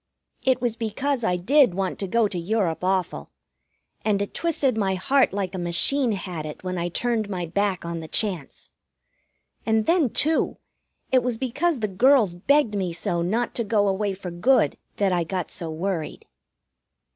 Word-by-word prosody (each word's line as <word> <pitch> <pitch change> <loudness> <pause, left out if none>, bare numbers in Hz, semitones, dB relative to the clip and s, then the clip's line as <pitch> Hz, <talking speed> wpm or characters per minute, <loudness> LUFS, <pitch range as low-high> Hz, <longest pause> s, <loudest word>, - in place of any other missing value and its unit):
It 260 -1 +2
was 235 -2 +1
because 235 +4 -2
I 180 -5 +1
did 245 +3 +3
want 190 -1 -2
to 195 - -2
go 225 +3 +2
to 185 -3 -4
Europe 180 -2 -1
awful, 185 - -1 0.7
and 205 -2 +1
it 200 - -3
twisted 290 -7 0
my 195 -3 0
heart 265 +8 +2
like 195 -1 -3
a 190 - -4
machine 220 +9 +2
had 180 -4 -5
it 155 +2 -8
when 185 0 -3
I 175 +1 -2
turned 220 +2 -1
my 180 -3 -3
back 190 +1 -1
on 170 0 -4
the 160 - -7
chance. 180 -6 -2 0.9
And 220 -1 +1
then, 330 -6 +3
too, 315 +7 +2 0.5
it 260 -1 +4
was 245 -1 -2
because 270 +4 -1
the 215 - +1
girls 220 0 +4
begged 235 +6 +2
me 185 -4 -2
so 170 +1 -1
not 220 +8 -1
to 235 - -1
go 205 -1 +1
away 195 0 -1
for 185 -2 -7
good 175 - +2 0.2
that 195 -2 +1
I 175 -1 +1
got 180 0 -4
so 165 - -4
worried. 165 0 -4
200 Hz, 180 wpm, -24 LUFS, 180-240 Hz, 0.9 s, it